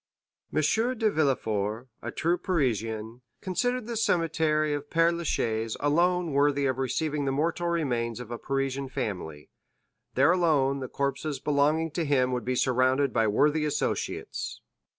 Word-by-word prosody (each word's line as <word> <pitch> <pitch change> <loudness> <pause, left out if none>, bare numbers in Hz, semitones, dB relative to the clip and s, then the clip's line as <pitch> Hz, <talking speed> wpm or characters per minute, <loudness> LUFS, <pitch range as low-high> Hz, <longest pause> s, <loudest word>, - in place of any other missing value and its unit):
M. 155 - +1 0.4
de 220 -1 +2
Villefort, 115 - 0
a - - -5
true 170 +2 +1
Parisian, 115 - -1 0.2
considered 245 +6 -1
the 235 0 -4
cemetery 160 -6 +1
of 145 0 -4
Père 165 +1 +3
Lachaise 115 -9 -1
alone 170 +3 +2
worthy 140 0 +2
of 130 -1 0
receiving 145 +2 -1
the 135 - +1
mortal 165 +5 0
remains 125 -9 -1
of 120 -1 -8
a 120 - -4
Parisian 135 0 -2
family; 85 - -5 0.6
there 165 - +5
alone 150 -6 +2
the 130 - -4
corpses 140 +1 -2
belonging 150 +3 +1
to 170 - -1
him 130 -4 +2
would 125 -1 -2
be 130 0 0
surrounded 130 +2 +2
by 115 -2 +2
worthy 150 +9 +2
associates. 150 -1 -2
140 Hz, 145 wpm, -27 LUFS, 125-160 Hz, 0.6 s, there